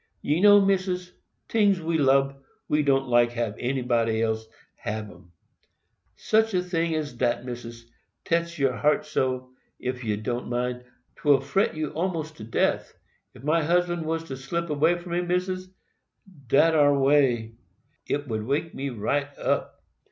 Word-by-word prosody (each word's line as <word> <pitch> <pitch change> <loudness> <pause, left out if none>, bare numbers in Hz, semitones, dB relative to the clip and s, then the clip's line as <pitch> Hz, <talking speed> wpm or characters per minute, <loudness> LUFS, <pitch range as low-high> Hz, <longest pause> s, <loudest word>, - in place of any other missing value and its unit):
"Ye 150 +4 +1
know, 205 0 +8
Missis, 185 -2 0 0.4
tings 205 -4 +3
we 165 0 -1
lub, 135 0 +2 0.3
we 150 - +2
don't 135 -2 +2
like 120 -1 +3
hab 115 -3 -2
anybody 120 -3 0
else 110 0 -1 0.3
hab 105 0 -5
'em. 85 - -18 0.8
Such 220 -1 +1
a 180 0 0
ting 165 -2 0
as 150 -4 -3
dat, 120 0 -1
Missis, 120 -2 -8 0.4
tetch 170 +1 0
your 135 -3 +2
heart 150 0 +2
so, 130 -4 -2 0.3
ef 125 0 -4
you 105 -2 -1
don't 120 +3 -3
mind, 125 0 -2 0.3
't - - -19
will 145 -2 +5
fret 140 +10 0
you 155 -2 -3
almost 160 -2 -3
to 110 - -9
death. 115 - -1 0.4
Ef - - -14
my 160 +3 +2
husband 175 +1 +1
was 165 0 -1
to 135 -5 -7
slip 170 +5 -3
away 160 +4 +3
from 175 0 -9
me, 175 +1 +1
Missis, 185 +1 -2 0.8
dat 160 +6 +4
ar 145 -2 +4
way, 135 -5 +2 0.5
it 145 - 0
ud 115 -6 -4
wake 140 +8 -2
me 140 +1 -3
right 135 +5 -1
up. - - -2
145 Hz, 160 wpm, -26 LUFS, 125-170 Hz, 0.8 s, know